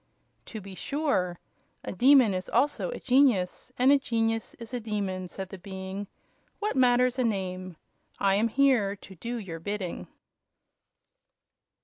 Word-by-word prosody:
"To 220 - -6
be 195 -1 -10
sure. 190 - -1 0.5
A - - -4
demon 250 0 +5
is 185 0 -3
also 285 - +1
a - - -5
genius; 250 -7 +2
and 255 +2 +5
a 285 - +6
genius 225 -3 -1
is 230 +1 -10
a 245 - -1
demon," 200 -4 -3
said 190 +1 -7
the 190 - -9
Being. 190 +1 -6 0.5
"What 425 0 -2
matters 250 0 +3
a - - +3
name? 185 -4 -2 0.4
I 195 -1 +3
am 210 +4 +3
here 235 -5 +3
to 195 - -13
do 235 +7 -5
your 180 -7 -6
bidding." 195 0 -4
215 Hz, 145 wpm, -28 LUFS, 190-250 Hz, 0.5 s, a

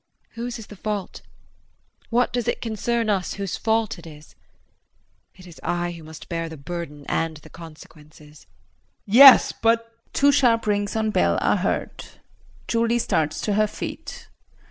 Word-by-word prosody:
Whose 240 +1 -6
is 225 - -10
the 210 - -12
fault? 205 0 -5 0.9
What 245 +1 +1
does 245 -2 -2
it - - -1
concern 230 +1 -2
us 195 -4 -1
whose 195 -3 -4
fault 220 -3 -1
it 170 - -13
is? 150 -1 -14 1.0
It 185 - -15
is 170 -2 -14
I 175 0 -2
who 170 -1 -10
must 155 0 -12
bear 165 -1 -3
the 160 - -9
burden 150 -1 -7
and 165 -1 -1
the 150 - -16
consequences. 155 -2 -15 0.6
JEAN. 205 - -1
Yes, 270 0 +9
but 230 0 0 0.2
[Two 285 +1 +4
sharp 235 -5 +3
rings 205 -1 -1
on 220 -1 0
bell 85 - +2
are - - +2
heard. - - -3 0.6
Julie 230 +1 +1
starts 155 -9 -1
to 210 - -1
her 215 +1 +2
feet. - - -8
200 Hz, 160 wpm, -23 LUFS, 165-230 Hz, 1.0 s, Yes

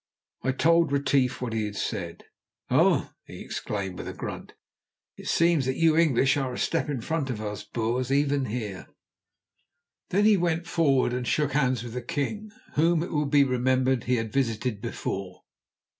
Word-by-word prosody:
I 130 - +1
told 165 +3 +3
Retief 135 -2 +1
what 115 -3 -3
he 110 -2 -1
said. 95 -5 -4 0.5
"Oh!" - - +3
he - - -11
exclaimed 95 -3 -4
with - - -6
a - - -6
grunt, - - -7 0.6
"it - - -10
seems 165 -5 +3
that 130 - 0
you 165 -1 +4
English 140 -5 +3
are 135 -2 -1
a - - -5
step - - 0
in 135 -5 -2
front 155 +1 -2
of 120 -4 -3
us 105 -1 -5
Boers, 120 +3 -2
even 140 -1 +2
here." 105 -5 -5 1.2
Then 205 +3 +2
he 215 -2 +6
went 170 -1 0
forward 140 -7 +2
and 125 -1 -3
shook 150 -2 +1
hands 130 -5 +1
with 120 -2 -7
the 125 - -3
king, 170 - -3 0.2
whom, 165 +2 +3
it 175 - -6
will 150 -1 0
be 145 -1 +5
remembered, 130 -1 +1
he 125 - +2
had 115 -2 -3
visited 115 -4 -1
before. 95 -2 -5
130 Hz, 175 wpm, -26 LUFS, 115-150 Hz, 1.2 s, he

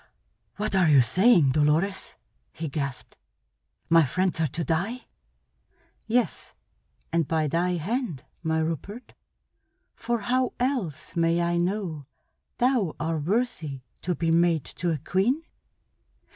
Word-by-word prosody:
"What 210 0 -2
are 180 -4 +4
you 145 -2 +7
saying, 175 - +5
Dolores?" 155 +7 +1 0.4
he 160 -1 -5
gasped. 140 -2 -5 0.7
"My 165 0 +6
friends 185 +5 0
are 160 - +2
to 165 +5 -3
die?" 195 +11 -2 1.0
"Yes, 235 +2 -1 0.6
and 165 -3 +2
by 160 -2 +1
thy 175 +5 +1
hand, 180 - -2 0.2
my 160 -1 0
Rupert. 165 - -4 0.8
For 235 -2 -2
how 255 +4 0
else 245 - -2
may 165 0 +2
I 170 0 +1
know 175 -5 -2 0.5
thou 240 - +1
are 160 0 -1
worthy 165 - -1 0.2
to 180 -1 -1
be 165 0 0
mate 165 -3 +2
to 175 - 0
a 160 - 0
queen?" 215 - 0
170 Hz, 125 wpm, -26 LUFS, 160-210 Hz, 1.0 s, you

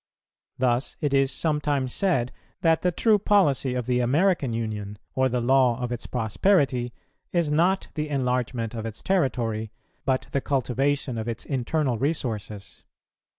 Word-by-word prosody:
Thus 125 +1 0
it 145 -4 -1
is 135 0 +3
sometimes 145 -4 0
said 135 -11 +1 0.3
that 165 -2 +3
the 180 - +2
true 215 +4 +3
policy 145 -11 +2
of 125 -2 -2
the 125 0 +1
American 145 +3 +2
Union, 105 -3 -4 0.2
or 130 0 +2
the 125 0 0
law 125 0 +3
of 125 -1 -3
its 120 - -4
prosperity, 125 - +1 0.4
is 170 -4 +1
not 175 +5 +2
the 150 -1 -3
enlargement 125 -4 -1
of 115 -1 -4
its 110 -1 -8
territory, 115 - 0 0.3
but 130 -1 0
the 140 - 0
cultivation 135 -1 0
of 110 - -4
its 115 -2 -4
internal 130 -2 -1
resources. 110 - -3
130 Hz, 150 wpm, -25 LUFS, 120-150 Hz, 0.4 s, is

